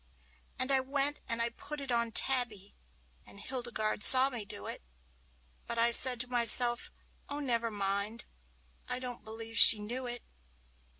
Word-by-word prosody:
And 255 +1 -3
I 270 - +2
went 275 +2 -1
and 230 - -1 0.2
put 300 -1 -12
it 275 -2 -9
on 235 -1 -4
Tabby, 225 -7 -3 0.5
and 200 - -16
Hildegarde 235 -3 -7
saw 265 +3 +9
me 235 -5 -8
do 100 - -11
it; - - -8 0.9
But 235 - -8
I 235 +1 0
said 250 +1 +4
to 250 - -5
myself, 240 0 +2 0.4
"Oh, 285 - -8
never 235 -5 -5
mind, 200 +2 -6 0.6
I - - -3
don't 250 -1 -8
believe 225 +1 -7
she 225 - +9
knew 240 +5 -9
it!" 240 -1 -6
240 Hz, 155 wpm, -27 LUFS, 225-255 Hz, 0.9 s, saw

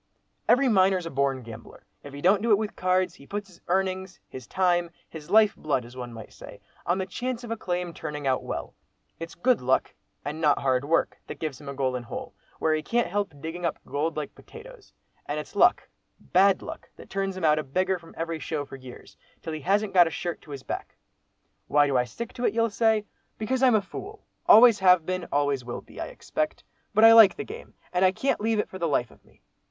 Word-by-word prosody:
"Every 265 +3 +5
miner's 190 -5 +3
a 165 - -5
born 135 -1 0
gambler; 115 -1 -12 0.2
if 145 - -10
he 140 +1 -8
don't 190 +4 +4
do 235 - -1
it 210 - +6
with 215 0 -4
cards, 185 -1 +1
he 140 -6 -16
puts 205 0 -4
his 175 - -19
earnings, 190 0 -1
his 130 -3 -10
time, 175 -2 +1 0.2
his 155 -2 -11
life 215 -1 +5
blood, 135 -5 -1
as 120 +2 -13
one 125 -1 -6
might 115 -2 -10
say, - - -12 0.3
on 175 - +2
the 190 - -2
chance 245 +5 -4
of 235 - -7
a - - 0
claim 180 -4 -3
turning 150 -3 -6
out 130 -1 +1
well. - - -5 0.5
It's 165 0 -7
good 250 +7 +2
luck, 130 +1 +1 0.3
and 150 +2 -4
not 150 -3 +4
hard 130 0 +1
work, 165 +3 +1
that - - -7
gives 150 -5 -5
him 140 - -8
a 140 - -6
'golden 130 -2 -1
hole,' 120 - -7 0.2
where 160 - +1
he 155 - 0
can't 235 +3 0
help 205 0 -1
digging 165 +4 -6
up 170 - -1
gold 150 +4 -2
like 150 -2 -4
potatoes, - - -14 0.4
and - - -2
it's - - -9
luck, - - +4 0.3
bad 190 +1 +3
luck, - - -9
that - - -13
turns 195 -1 -2
him 185 - -6
out 155 0 +4
a - - -2
beggar 185 +6 0
from 165 - -16
every 165 0 -3
'show' 150 -3 -3
for 135 - -10
years, 130 -2 -13 0.3
till 160 - -5
he 155 - -5
hasn't 200 +5 +1
got 175 -2 +7
a - - -1
shirt 175 +1 -4
to - - -19
his 140 -2 -7
back. - - -6 0.7
Why 145 0 +4
do 140 -2 -1
I 125 -1 +3
stick 230 - -7
to 245 - -3
it, 205 - +1
you'll 230 -1 +2
say? 220 0 +2 0.3
Because 255 +4 -1
I'm 255 -3 +5
a 215 - +3
fool, 400 - -9 0.2
always 230 0 +8
have 180 -3 +5
been, 185 0 -3
always 145 -2 +1
will 120 0 -6
be, - - -11
I - - -3
expect. 310 -11 -4 0.3
But 215 +1 +5
I 225 - +10
like 225 -4 +8
the 425 - -5
game, 450 +4 -10 0.2
and 180 +1 +2
I 185 - +6
can't 265 +3 -1
leave 225 +1 +1
it 210 - 0
for 190 - -9
the 170 - 0
life 125 -6 0
of - - -21
me. - - -27
180 Hz, 235 wpm, -26 LUFS, 145-210 Hz, 0.7 s, I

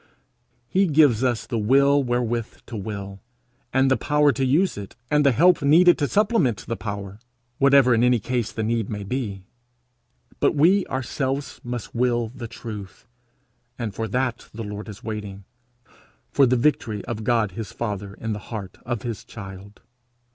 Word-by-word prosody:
He 195 +6 +2
gives 145 -7 +4
us 120 -3 0
the 115 - -2
will 140 +6 +4
wherewith 120 -2 -2
to 120 - -8
will, 100 -1 -6 0.5
and 135 +1 +3
the - - +5
power 150 0 +3
to 135 +2 -2
use 155 +9 +2
it, 100 -1 -8 0.2
and 150 0 +4
the 140 - +5
help 175 +9 +4
needed 170 +5 +6
to 145 - +1
supplement 205 - +1
the 115 - -3
power, 100 -2 -6 0.4
whatever 140 -2 +6
in 115 0 +3
any 125 0 +4
case 120 0 -2
the 110 - -3
need 115 -1 -1
may 105 -1 -4
be; 100 -3 -4 1.0
but - - +2
we 180 +7 +4
ourselves 135 +2 -3
must 120 -1 -5
will 120 -1 +1
the 120 -1 -8
truth, 105 -4 -9 0.7
and 110 -4 -4
for 110 +3 -3
that 125 +2 -2
the 115 - -5
Lord 105 +1 -7
is 105 0 -10
waiting, 105 -3 -6 0.9
for 140 -2 +5
the 125 - +3
victory 115 -6 0
of 110 -2 -4
God 115 -3 +1
his 110 +3 -6
father 100 -3 -4
in 115 -1 -4
the 105 - -5
heart 105 -5 -7
of 120 -3 -3
his 115 -3 -5
child. 100 -1 -11
120 Hz, 170 wpm, -23 LUFS, 105-135 Hz, 1.0 s, needed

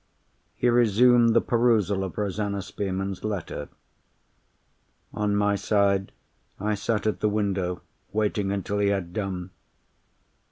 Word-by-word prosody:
He 125 - 0
resumed 120 0 +5
the 115 - +6
perusal 110 -5 +2
of 95 - -6
Rosanna 100 -1 -2
Spearman's 95 -1 -4
letter. 105 -5 -4 1.4
On 105 -1 0
my 105 0 +2
side, 100 -1 +1 0.5
I 105 +2 0
sat 105 +1 -1
at 110 - 0
the 105 - +2
window, 100 -4 -1 0.3
waiting 105 -2 0
until 100 +1 -2
he 100 - +2
had 95 -4 -1
done. 95 -3 -4
100 Hz, 120 wpm, -26 LUFS, 95-110 Hz, 1.4 s, the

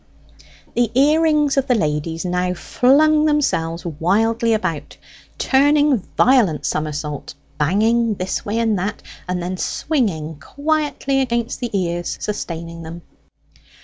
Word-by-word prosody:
The 240 -2 +1
ear 300 +3 +4
rings 300 -3 +2
of 275 0 +1
the 250 - +3
ladies 160 -2 -2
now 180 0 -1
flung 300 - +3
themselves 175 - 0
wildly 220 - +1
about, 185 -8 -3 0.4
turning 290 -1 +3 0.2
violent 230 - +3
summersaults, 150 -1 -3 0.2
banging 220 +8 +2
this 185 0 -3
way 210 +2 -2
and 225 -4 +1
that, 200 +3 -4 0.3
and 180 -1 -2
then 185 +1 -3
swinging 175 - -2
quietly 285 - -1
against 235 -2 -2
the 240 - -3
ears 175 -1 -2
sustaining 170 -5 -5
them. 165 +1 -9
210 Hz, 120 wpm, -20 LUFS, 170-270 Hz, 0.4 s, ear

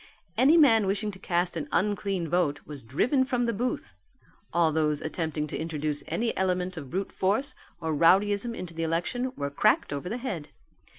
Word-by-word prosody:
Any 270 +8 +5
man 225 -10 +5
wishing 210 +2 0
to 190 - -12
cast 175 -1 0
an 150 -3 -4
unclean 195 -2 0
vote 160 -3 +1
was 145 -3 -8
driven 225 - +1
from 250 -2 0
the 235 - 0
booth: 245 - -3 0.6
all 170 -2 +3
those 150 -1 +1
attempting 155 -1 -2
to 150 - -6
introduce 155 -2 -2
any 235 0 -1
element 185 -1 0
of 145 -5 -7
brute 190 +6 -3
force 215 +9 0 0.3
or 160 -2 -2
rowdyism 200 +8 +3
into 180 -5 -7
the 165 - -4
election 175 +11 -1
were 140 0 -3
cracked 145 - +2
over 145 +5 -4
the 235 - -2
head. 195 - -4
180 Hz, 180 wpm, -27 LUFS, 160-215 Hz, 0.6 s, Any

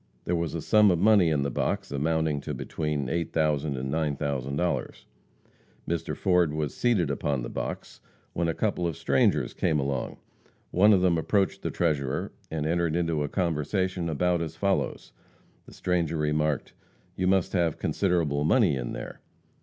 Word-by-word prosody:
There 90 - 0
was 85 -1 -2
a 80 - -4
sum 105 -1 +5
of 90 - +3
money 100 -2 +5
in 75 -3 +1
the 70 - -2
box - - -2
amounting 75 +1 0
to - - -5
between 75 -3 -3
$8,000 75 -1 0
and 65 +2 -3
$9,000. 70 0 -2 0.8
Mr. 85 -1 -2
Ford 90 -5 +2
was 75 -2 -2
seated 100 -11 +1
upon 70 -2 -1
the - - -6
box - - -5 0.3
when 85 0 0
a 80 - -1
couple 95 -5 0
of 80 - -4
strangers - - +2
came 80 -4 +1
along. 70 0 -2 0.5
One 105 +4 +5
of 95 -3 +5
them 90 -3 +3
approached 95 +2 0
the - - -2
treasurer, 70 -5 -1 0.2
and 80 -2 -3
entered 85 0 0
into 85 -3 0
a 75 - -2
conversation 90 +1 -1
about 85 +2 +1
as 80 -1 -4
follows: 100 +3 -1 0.6
The - - -12
stranger 85 -3 0
remarked, 75 -1 0 0.4
"You 90 - 0
must 95 -1 +2
have 85 -4 +1
considerable 85 -7 0
money 75 - +3
in - - -4
there?" - - -7
80 Hz, 160 wpm, -27 LUFS, 75-90 Hz, 0.8 s, sum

